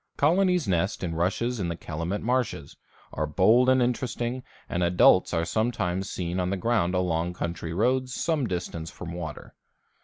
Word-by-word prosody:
Colonies 180 +2 +3
nest 95 +1 0
in 85 -2 -2
rushes 100 +8 -1
in 90 - -1
the 85 - -2
Calumet 85 +5 -4
marshes, 125 0 -1 0.4
are 75 +1 -1
bold 110 +11 +4
and 130 -1 +4
interesting, 125 0 -2 0.3
and 90 - -2
adults 90 +1 +5
are 85 -1 0
sometimes 95 -4 -1
seen 90 0 -3
on 90 0 0
the 100 - -1
ground 95 -4 +1
along 90 -1 0
country 85 -1 -4
roads 125 +8 +1
some 155 -7 0
distance 85 -3 -4
from 85 -1 -8
water. 85 -4 -7
95 Hz, 160 wpm, -26 LUFS, 85-125 Hz, 0.4 s, adults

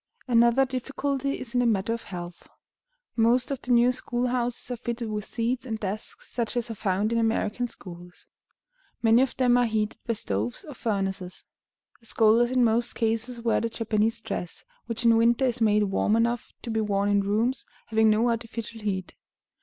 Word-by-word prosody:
Another 235 +2 +4
difficulty 275 +2 -2
is 240 -1 -7
in 245 - +2
the 245 - +3
matter 215 0 +1
of 230 - -6
health. 175 -2 -8 0.7
Most 240 +3 +3
of 275 - -3
the 250 - -4
new 240 +1 +5
school 250 -1 -2
houses 245 0 -2
are - - -1
fitted 235 -1 -4
with 210 -1 -3
seats 240 +2 -2
and 225 -4 -4
desks, 215 - -5
such 235 0 -2
as 240 -1 -2
are - - -3
found 205 +1 0
in 230 - +2
American 225 +1 0
schools. 175 -5 -12 0.8
Many 225 +2 +6
of 265 - 0
them 245 -1 +4
are 245 - +3
heated 215 0 -1
by 230 - +1
stoves 110 - -3
or 295 - -8
furnaces. 195 -5 -3 0.5
The 230 - -18
scholars 225 +2 +4
in 255 -1 +3
most 235 +1 +1
cases 230 +1 -1
wear 230 -1 +1
the 230 - -1
Japanese 225 0 0
dress, 200 -6 -5 0.2
which 230 0 -3
in 230 -1 +6
winter 235 +3 +3
is 245 -1 -1
made 210 -1 +4
warm 205 +2 +1
enough 235 +1 0
to 235 - -4
be 220 0 0
worn 200 -1 0
in 205 0 +3
rooms 225 +6 0 0.2
having 220 -1 +3
no 215 +3 +3
artificial 230 -1 -5
heat. 190 -3 -3
230 Hz, 185 wpm, -26 LUFS, 215-245 Hz, 0.8 s, Many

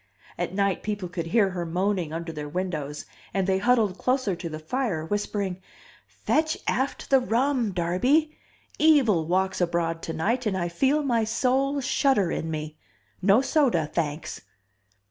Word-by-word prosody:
At - - -3
night 200 -1 +1
people 205 -3 -3
could 170 -2 -4
hear 195 +2 +3
her 180 -1 -3
moaning 180 0 -1
under 165 +1 -4
their 150 -2 -6
windows, 155 -4 -4 0.3
and 195 -1 +1
they 190 0 +1
huddled 215 -4 +2
closer 255 -7 +1
to 170 0 -6
the 155 - -5
fire, 165 0 -2
whispering, 200 -1 -2 0.5
"Fetch 315 0 0
aft 265 +2 -2
the 270 - +7
rum, 245 -1 +1
Darby! 245 - +1 0.4
Evil 255 - +4
walks 190 +2 0
abroad 170 -1 0
tonight 215 +10 -1
and 195 -2 0
I 175 -1 -1
feel 275 - +1
my 235 -5 +1
soul 265 +5 +1
shudder 250 -8 +2
in 160 - -3
me. 155 -1 -5 0.4
No 200 +7 +4
soda, 265 - +2
thanks!" 150 - -3
195 Hz, 150 wpm, -26 LUFS, 170-250 Hz, 0.5 s, the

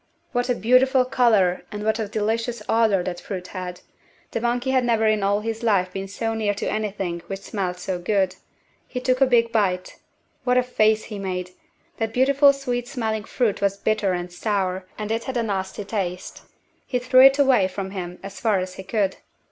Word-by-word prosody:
What 245 0 -1
a 245 - +2
beautiful 255 +3 +4
colour 220 -8 +3
and 210 0 -5
what 220 +1 +1
a 220 - -1
delicious 220 +2 -2
odour 220 -5 +3
that 175 -1 -4
fruit 185 -2 -6
had! 180 -1 -6 0.5
The 230 - -2
monkey 245 +2 0
had 260 -1 +3
never 230 -2 +2
in 215 -1 +2
all 200 +1 +1
his 225 +1 -4
life 195 -5 +1
been 195 0 -4
so 225 +3 -3
near 215 -2 0
to - - -4
anything 195 -5 -2
which 195 0 -5
smelled 185 -3 -3
so 180 0 -3
good. 190 0 +1 0.5
He 250 - -4
took 255 +1 0
a 270 - +6
big 235 -2 +3
bite. 185 -5 0 0.4
What 250 0 +2
a 250 - +4
face 220 -3 +2
he 210 -2 -7
made! 180 -2 -4 0.5
That 225 -1 -2
beautiful 280 +2 +5
sweet 250 -3 -3
smelling 220 -4 -2
fruit 235 -6 0
was 200 0 +1
bitter 205 -2 0
and 175 0 -4
sour, 190 -2 -1
and 215 0 -4
it 225 +1 -1
had 260 -2 -3
a 235 - +1
nasty 195 -1 -3
taste. 190 -3 -4 0.5
He 250 - 0
threw 255 +1 +5
it 270 +1 +8
away 265 -9 +4
from 190 0 -5
him 180 -2 -6
as 195 0 -8
far 215 -4 +2
as 185 0 -3
he 190 - -8
could. 195 -1 -1
215 Hz, 200 wpm, -23 LUFS, 190-240 Hz, 0.5 s, it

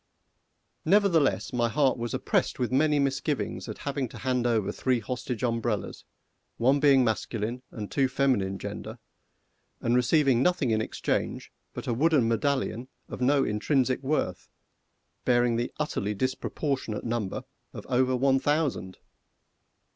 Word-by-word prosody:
Nevertheless, 175 -8 +3
my 120 -1 +1
heart 135 +2 +2
was 120 -1 -3
oppressed - - 0
with 125 -1 -1
many 150 +3 +3
misgivings 140 +1 -1
at - - -6
having 140 -3 -3
to - - -10
hand 125 -2 0
over 110 -4 +1
three 130 -2 0
hostage 125 +1 -4
umbrellas 115 -3 -2 0.5
one 135 +4 +3
being 140 -2 +5
masculine 115 +1 -2
and 105 -3 -7
two 135 -2 +2
feminine 125 -8 +1
gender - - -7 0.8
and 120 - +1
receiving 125 0 +3
nothing 145 -6 +2
in 110 0 +2
exchange - - -2 0.2
but - - -7
a 120 - 0
wooden 145 -1 +3
medallion 125 0 -1 0.2
of - - -7
no 135 +2 +3
intrinsic 130 +4 +1
worth, 145 +3 -2 0.7
bearing 120 -1 +3
the 120 +1 -2
utterly 105 -9 -2
disproportionate 130 0 -2
number 115 -4 -3 0.3
of - - -9
over 130 +1 +2
one 135 +1 +3
thousand! 145 -9 -1
130 Hz, 135 wpm, -27 LUFS, 115-140 Hz, 0.8 s, being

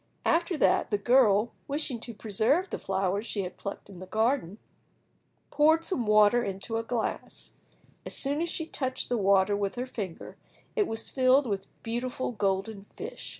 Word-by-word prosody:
After 340 0 +2
that - - +3
the 205 - +1
girl, 225 -1 +4 0.2
wishing 280 -4 -1
to 235 +1 -6
preserve 225 - +1
the - - -3
flowers 195 +3 -1
she 200 - -2
had 180 - -6
plucked 200 - -7
in 195 -3 -12
the 185 - -9
garden, 220 -3 0 0.9
poured 315 +2 +4
some 250 - -2
water 215 +3 +5
into 200 +3 -3
a 225 - -2
glass: 230 0 -4 0.5
as - - -5
soon 285 +3 0
as 340 - -1
she 320 - -3
touched 260 -4 -3
the 245 - +1
water 195 0 +4
with 200 -1 -2
her 250 +1 -3
finger, 200 -9 -7 0.4
it 425 -4 +2
was 225 0 -3
filled 260 +1 +4
with 200 -4 -3 0.2
beautiful 245 +3 -3
golden 200 -1 -2
fish. - - -7
225 Hz, 170 wpm, -28 LUFS, 200-260 Hz, 0.9 s, water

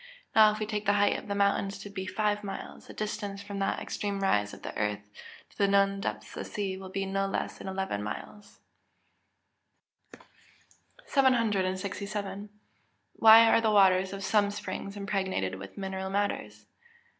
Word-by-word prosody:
Now, 215 -1 +8
if 210 - -4
we 215 - -2
take 210 -1 -4
the 205 - +5
height 205 0 +3
of - - -13
the 200 - -2
highest 200 0 +3
mountain 195 - -3
to 205 - -8
be 190 -2 -5
five 210 +1 0
miles, 195 -1 -7
the - - -10
distance 205 -2 -4
from 200 -1 -6
that 195 - 0
extreme 200 -1 -3
rise 105 - +2
of - - -12
the - - -6
earth, 105 -1 -2 0.4
to - - -24
the 200 - +4
known 195 0 +3
depth - - -4
of - - -4
the - - -10
sea, 195 -2 -3
will 190 0 -9
be 195 +1 -2
no 195 0 -1
less 195 - -3
than - - -8
eleven 190 - -2
miles. 200 - -8 2.5
767. 200 -5 0 0.7
_Why 225 +1 +10
are 225 - +5
the 220 - +2
waters 190 -2 +4
of 195 0 -6
some 205 0 +2
springs 200 0 -6
impregnated 190 - -2
with 100 0 -10
mineral 190 -1 -4
matters? 200 +1 -2
200 Hz, 170 wpm, -29 LUFS, 190-205 Hz, 2.5 s, Why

